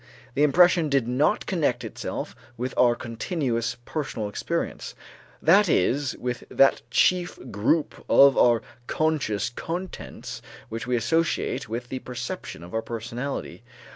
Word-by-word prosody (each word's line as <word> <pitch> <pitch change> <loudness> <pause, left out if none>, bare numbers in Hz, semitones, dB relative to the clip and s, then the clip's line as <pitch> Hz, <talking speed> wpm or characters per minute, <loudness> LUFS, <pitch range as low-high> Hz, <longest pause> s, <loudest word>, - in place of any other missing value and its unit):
The 140 - 0
impression 170 +2 +5
did 135 -4 +2
not 140 +10 +1
connect 155 - 0
itself - - -5 0.2
with 125 +2 -3
our 120 -1 +4
continuous 120 -1 -2
personal 135 -8 -3
experience, - - -3 0.5
that 190 +4 +6
is, 130 +5 +1
with 125 0 -4
that 135 - +4
chief 180 -1 +2
group 120 +10 0
of 140 0 +7
our 120 -2 +4 0.2
conscious 135 -9 0
contents 175 +8 -6 0.3
which 115 +2 -5
we 125 - +1
associate 135 0 0
with 120 +2 -4
the 130 - -4
perception 120 -10 -6
of 85 - -11
our 110 - 0
personality. 120 +4 -5
125 Hz, 130 wpm, -25 LUFS, 115-155 Hz, 0.5 s, of